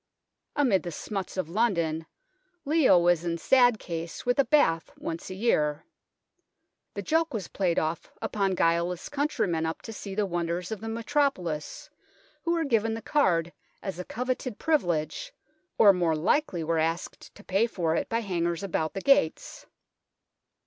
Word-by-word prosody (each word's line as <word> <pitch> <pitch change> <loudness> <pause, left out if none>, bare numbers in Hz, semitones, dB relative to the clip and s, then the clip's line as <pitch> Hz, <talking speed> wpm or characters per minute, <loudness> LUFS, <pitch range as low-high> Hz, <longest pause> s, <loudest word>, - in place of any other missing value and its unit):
Amid 245 - +3
the 175 - -5
smuts 195 +4 -5
of 185 - -1
London, 170 -6 0 0.6
Leo 295 - +5
was 175 -1 +3
in 170 -1 -1
sad 245 +4 +4
case 165 -3 -6
with 245 +2 +1
a - - +7
bath 165 - +3
once 165 +2 -5
a 185 - -6
year. 155 -9 +1 1.1
The - - -4
joke 320 -3 +1
was 195 -6 -3
played 180 -4 0
off 160 +2 -2
upon 195 -3 0
guileless 170 - 0
countrymen 280 - 0
up 160 - -5
to 225 - -7
see 200 -2 -7
the 210 0 +1
wonders 175 0 -2
of 220 - -4
the 225 - -5
metropolis, 230 - -1 0.5
who 340 - 0
were 335 -1 +1
given 225 -4 +1
the 225 - -7
card 175 - +2 0.3
as 190 -3 -5
a - - -3
coveted 250 +1 -3
privilege 295 - 0 0.4
or 205 -2 +8
more 170 -3 +1
likely 175 - +1
were 165 0 0
asked 165 +2 -3
to 205 - -14
pay 200 +5 +2
for 165 -7 -1
it - - -1
by 230 +1 0
hangers 170 -3 -1
about 160 -4 -2
the 195 - -3
gates. 275 -12 +1
190 Hz, 160 wpm, -27 LUFS, 165-240 Hz, 1.1 s, or